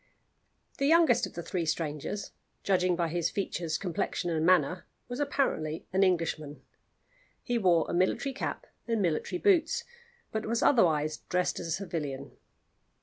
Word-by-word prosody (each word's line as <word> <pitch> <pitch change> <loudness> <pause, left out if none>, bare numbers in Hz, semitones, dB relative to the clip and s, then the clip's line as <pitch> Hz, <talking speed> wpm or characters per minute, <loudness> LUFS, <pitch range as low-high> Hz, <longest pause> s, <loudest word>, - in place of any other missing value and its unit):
THE 275 - +2
youngest 325 -6 +5
of - - -14
the 170 - -5
three 175 +1 -2
strangers 160 +4 -3 0.3
judging 185 -2 +2
by 170 0 -1
features, 170 -2 -1
complexion, 180 -1 -2
and 160 -1 0
manner 180 0 +3 0.2
was 245 +2 -5
apparently 265 - -1
an 190 - +3
Englishman. 165 -5 0 0.8
He 240 -2 0
wore 175 -5 +4
a - - -4
military 230 +10 +1
cap 275 - -4 0.2
and 230 -1 0
military 175 - 0
boots, 355 -5 +3 0.5
but 220 0 -3
was 230 +1 0
otherwise 155 - +3
dressed 180 0 0
as - - -5
a - - -4
civilian. 150 -7 -4
180 Hz, 145 wpm, -29 LUFS, 160-225 Hz, 0.8 s, youngest